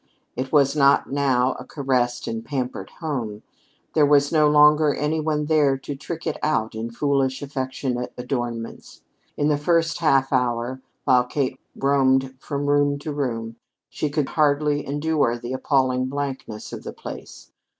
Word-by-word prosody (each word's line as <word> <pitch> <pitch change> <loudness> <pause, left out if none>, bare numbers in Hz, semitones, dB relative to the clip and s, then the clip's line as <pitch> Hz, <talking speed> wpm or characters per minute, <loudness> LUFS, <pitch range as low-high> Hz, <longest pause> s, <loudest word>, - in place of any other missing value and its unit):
It 130 +1 -4
was 145 -1 +4
not 140 -2 +4
now 135 -2 +2
a - - -7
caressed 125 -4 -1
and 115 0 -3
pampered 130 -2 -4
home; 120 -10 -3 0.5
there 155 - +4
was 145 0 +4
no 155 -2 +4
longer 150 0 +5
any 150 +2 -1
one 150 -1 -1
there 145 -3 +3
to 140 +2 -6
trick 160 +4 -7
it - - -2
out 115 -8 0
in 110 +1 -4
foolish 135 +2 0
affectionate 130 -2 -3
adornments. 120 -2 -5 0.3
In 145 - +1
the 150 -1 +2
first 165 +1 +1
half 135 -5 +2
hour, 125 0 0 0.2
while 125 -3 +4
Kate 130 0 -2 0.2
roamed 135 -1 +2
from 140 +1 -4
room 145 0 +2
to 150 +2 -5
room, 115 -5 -3 0.3
she 150 - -2
could 145 -1 -1
hardly 145 -1 +2
endure 145 -4 0
the 120 +2 -6
appalling 130 -1 +1
blankness 135 -5 -5
of - - -6
the - - -7
place. - - -10
140 Hz, 155 wpm, -23 LUFS, 125-150 Hz, 0.5 s, longer